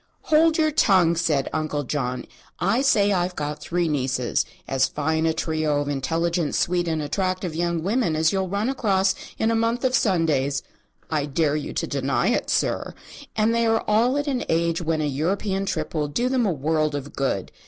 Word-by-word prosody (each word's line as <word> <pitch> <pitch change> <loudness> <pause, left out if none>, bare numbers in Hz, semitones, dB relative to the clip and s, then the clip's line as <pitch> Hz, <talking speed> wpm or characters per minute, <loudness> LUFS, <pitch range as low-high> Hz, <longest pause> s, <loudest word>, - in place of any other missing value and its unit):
"Hold 320 +1 +5
your 310 -1 +2
tongue," 185 - +4
said 160 -5 +1
Uncle 155 -2 -1
John. 125 -2 -3 0.3
"I 200 +8 +1
say 205 -7 +3
I've 180 -1 0
got 150 0 -4
three 175 +2 -1
nieces 130 -4 0 0.2
as 135 -1 +2
fine 160 +2 0
a - - +3
trio 155 -2 0
of 145 - -2
intelligent, 165 +3 -1
sweet 175 0 +1
and 160 -2 -1
attractive 185 +2 -2
young 170 0 -1
women 205 -4 +1
as 160 +2 +2
you'll 190 -1 -1
run 200 +4 -1
across 195 -7 +1 0.2
in 220 - +1
a - - +1
month 230 +2 0
of 255 - +2
Sundays. 160 - +1 0.5
I 150 -2 0
dare 150 +1 +1
you 150 - -3
to - - -1
deny 140 - 0
it, 240 - 0
sir. - - 0 0.4
And 220 +1 +2
they 230 0 +2
are 225 0 +2
all 235 +6 +3
at 290 - -1
an 265 -4 -1
age 165 +1 +1
when 160 -1 0
an 150 -1 -1
European 195 +7 -1
trip - - -3
will 150 -2 0
do 240 - -1
them 255 -4 +1
a - - +2
world 155 0 0
of 145 0 -6
good. 130 -9 -1
170 Hz, 195 wpm, -24 LUFS, 150-205 Hz, 0.5 s, Hold